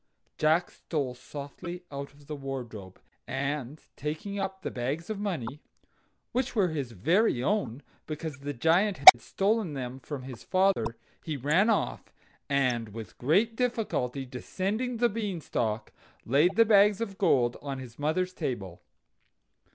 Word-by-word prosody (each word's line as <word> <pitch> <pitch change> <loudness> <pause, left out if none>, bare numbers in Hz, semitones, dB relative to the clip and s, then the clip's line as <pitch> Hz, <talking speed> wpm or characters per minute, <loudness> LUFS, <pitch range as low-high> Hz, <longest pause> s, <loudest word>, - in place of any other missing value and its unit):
Jack 160 +3 +3
stole 140 -6 -3
softly 145 +7 -8
out 140 0 -6
of 145 0 -20
the 150 +1 -5
wardrobe, 120 -9 -7 0.3
and 140 +1 -3 0.2
taking 160 +8 -4
up 190 0 -4
the - - -3
bags 140 - -3
of 210 - -4
money 150 - -3 0.7
(which 255 0 -1
were 195 -5 +3
his 140 -6 -3
very 155 - +2
own, 145 - -1 0.2
because 155 -2 -5
the 145 +1 -4
Giant 170 - +2
had 120 -3 +11
stolen 200 -4 0
them 130 0 -5
from 135 -1 -6
his 130 -3 -9
father), 185 - +1 0.3
he 155 -3 -3
ran 155 - +3
off, 220 - -1 0.4
and 125 -5 +1
with 110 -2 -9
great 200 - +2
difficulty 215 - -1
descending 200 - -3
the 240 +1 +4
Beanstalk, 170 - -2 0.3
laid 145 +9 +3
the 230 - +6
bags 210 -1 +5
of 200 -4 -4
gold 125 - +3
on 140 -2 -4
his 125 -2 -10
mother's 180 +5 0
table. 100 - -4
150 Hz, 145 wpm, -29 LUFS, 130-195 Hz, 0.7 s, had